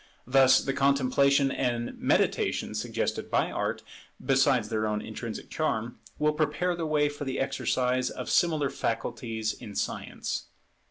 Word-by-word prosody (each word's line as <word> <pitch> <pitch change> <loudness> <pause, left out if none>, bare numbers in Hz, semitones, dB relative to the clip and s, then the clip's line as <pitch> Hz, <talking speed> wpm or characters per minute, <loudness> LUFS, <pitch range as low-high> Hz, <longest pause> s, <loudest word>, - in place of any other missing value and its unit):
Thus 130 +1 +6
the 135 - -2
contemplation 140 0 +3
and 120 -2 -1
meditation - - +1
suggested - - -2
by - - +1
Art, - - -2 0.4
besides 135 -4 +3
their 110 -1 0
own 105 0 -1
intrinsic 110 +1 -7
charm, 120 -7 -2 0.2
will 150 0 +2
prepare 155 +4 0
the 165 -2 -3
way 150 -1 +2
for 145 0 -5
the 135 -2 -3
exercise 130 -1 0
of - - -6
similar 155 -5 +2
faculties 115 -1 -2
in 100 - -10
Science. - - -3
135 Hz, 140 wpm, -28 LUFS, 120-145 Hz, 0.4 s, Thus